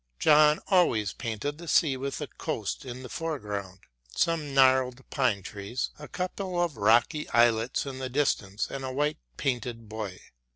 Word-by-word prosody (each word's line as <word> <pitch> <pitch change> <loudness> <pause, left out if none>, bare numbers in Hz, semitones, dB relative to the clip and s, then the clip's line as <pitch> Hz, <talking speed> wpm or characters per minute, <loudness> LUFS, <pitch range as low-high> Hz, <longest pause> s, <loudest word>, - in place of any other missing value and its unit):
John 150 0 +5
always 120 - +3
painted 130 +6 -4
the 170 - -9
sea 150 -4 +3
with 140 +3 -4
a - - -1
coast 115 0 -4
in 130 0 -7
the - - -6
foreground, 105 - -4 0.3
some 160 -4 0
gnarled 130 -1 +3
pine 120 -8 +1
trees, 100 +7 -4
a 150 - -8
couple 185 0 -3
of 170 -5 0
rocky 115 +8 +3
islets 115 +2 +3
in 135 -1 -6
the 130 -1 -3
distance 115 -7 0
and 135 -1 -5
a 130 - -3
white 145 +3 0 0.2
painted 120 -3 -2
buoy. 105 -4 -6
130 Hz, 160 wpm, -28 LUFS, 110-150 Hz, 0.3 s, John